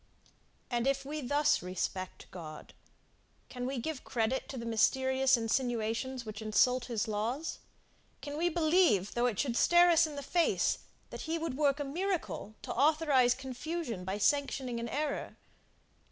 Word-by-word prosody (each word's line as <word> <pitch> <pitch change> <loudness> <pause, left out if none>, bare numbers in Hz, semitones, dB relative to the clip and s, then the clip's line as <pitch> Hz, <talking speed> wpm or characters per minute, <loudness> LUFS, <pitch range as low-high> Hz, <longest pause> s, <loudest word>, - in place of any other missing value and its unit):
And, 240 +1 0
if 275 0 +1 0.2
thus 290 +2 +3
we - - -10
respect 185 +1 -4
God, 155 -4 -9 0.8
can 250 -1 -4
we 270 0 -3
give 285 +3 -4
credit 240 +3 -1
to 265 - -6
the 230 - -5
mysterious 260 +3 +3
insinuations 235 +1 -1
which 215 0 -7
insult 240 +3 +2
his 230 -4 -2
laws? 225 +9 -2 0.6
Can 290 0 -6
we 340 +3 +1
believe, 315 - +3
though 240 +1 +2
it 225 -5 -2
should 245 0 0
stare 345 +6 +6
us 335 -1 +5
in 300 - -8
the 285 - -5
face, 345 +2 +1 0.3
that - - -7
he 330 - +1
would 320 -5 -3
work 285 0 +2
a - - -1
miracle 320 - -3
to - - -4
authorize 280 -3 +3
confusion 265 - -5
by 190 +2 -3
sanctioning 260 0 0
an 235 0 -4
error? 295 +2 -3
260 Hz, 155 wpm, -32 LUFS, 230-300 Hz, 0.8 s, stare